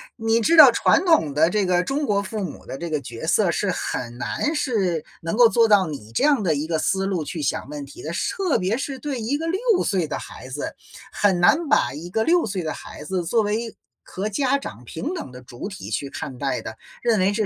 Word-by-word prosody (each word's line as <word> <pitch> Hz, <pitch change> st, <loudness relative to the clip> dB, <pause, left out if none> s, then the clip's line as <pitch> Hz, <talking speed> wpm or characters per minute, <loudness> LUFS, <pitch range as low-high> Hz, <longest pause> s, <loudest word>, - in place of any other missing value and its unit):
你 225 Hz, 0 st, +1 dB
知 330 Hz, +9 st, +3 dB
道 285 Hz, -6 st, +11 dB
传 330 Hz, +8 st, +3 dB
统 320 Hz, -, +3 dB
的 160 Hz, +3 st, +4 dB
这 205 Hz, 0 st, +1 dB
个 180 Hz, 0 st, +2 dB
中 280 Hz, +5 st, -1 dB
国 200 Hz, -5 st, +1 dB
父 205 Hz, +1 st, -4 dB
母 165 Hz, -, -7 dB
的 -, -, -6 dB
这 170 Hz, +2 st, -5 dB
个 155 Hz, -2 st, 0 dB
角 120 Hz, -3 st, -7 dB
色 -, -, +3 dB
是 -, -, -1 dB
很 120 Hz, -1 st, -4 dB
难 295 Hz, -, -2 dB
是 195 Hz, -, 0 dB, 0.2 s
能 165 Hz, +7 st, -3 dB
够 240 Hz, -2 st, +7 dB
做 230 Hz, -1 st, +4 dB
到 205 Hz, -3 st, +5 dB
你 115 Hz, -8 st, -8 dB
这 -, -, 0 dB
样 285 Hz, -5 st, +4 dB
的 160 Hz, -4 st, +2 dB
一 145 Hz, +2 st, -2 dB
个 160 Hz, -1 st, 0 dB
思 195 Hz, +3 st, 0 dB
路 185 Hz, -5 st, -1 dB
去 155 Hz, +2 st, -5 dB
想 140 Hz, -1 st, -2 dB
问 145 Hz, -1 st, -6 dB
题 140 Hz, -, -12 dB
的。 155 Hz, -, -5 dB
是 175 Hz, -, -1 dB
特 375 Hz, -6 st, +1 dB
别 190 Hz, +5 st, 0 dB
是 270 Hz, 0 st, -4 dB
对 270 Hz, -1 st, -4 dB
一 265 Hz, +6 st, -1 dB
个 325 Hz, -, -4 dB
6 390 Hz, +3 st, +1 dB
岁 185 Hz, -6 st, 0 dB
的 -, -, -3 dB
孩 -, -, -9 dB
子， 140 Hz, +3 st, -5 dB, 0.4 s
很 195 Hz, -4 st, +2 dB
难 305 Hz, -, +4 dB
把 275 Hz, -, +3 dB
一 165 Hz, +4 st, -7 dB
个 220 Hz, +4 st, 0 dB
6 345 Hz, +6 st, +3 dB
岁 190 Hz, -4 st, -3 dB
的 155 Hz, -, -2 dB
孩 -, -, -10 dB
子 180 Hz, +3 st, -2 dB
作 230 Hz, +6 st, +2 dB
为 220 Hz, +2 st, -2 dB, 0.3 s
和 200 Hz, +3 st, -4 dB
家 270 Hz, +5 st, +1 dB
长 125 Hz, -, -8 dB
平 250 Hz, -, -4 dB
等 335 Hz, -, -6 dB
的 125 Hz, -, -10 dB
主 125 Hz, +5 st, -8 dB
体 200 Hz, -1 st, -8 dB
去 140 Hz, -, -3 dB
看 130 Hz, -2 st, -6 dB
待 135 Hz, -2 st, -2 dB
的， 110 Hz, -, -8 dB, 0.3 s
认 230 Hz, -3 st, +3 dB
为 190 Hz, +2 st, +3 dB
这 215 Hz, +1 st, 0 dB
195 Hz, 260 characters per minute, -23 LUFS, 155-245 Hz, 0.4 s, 道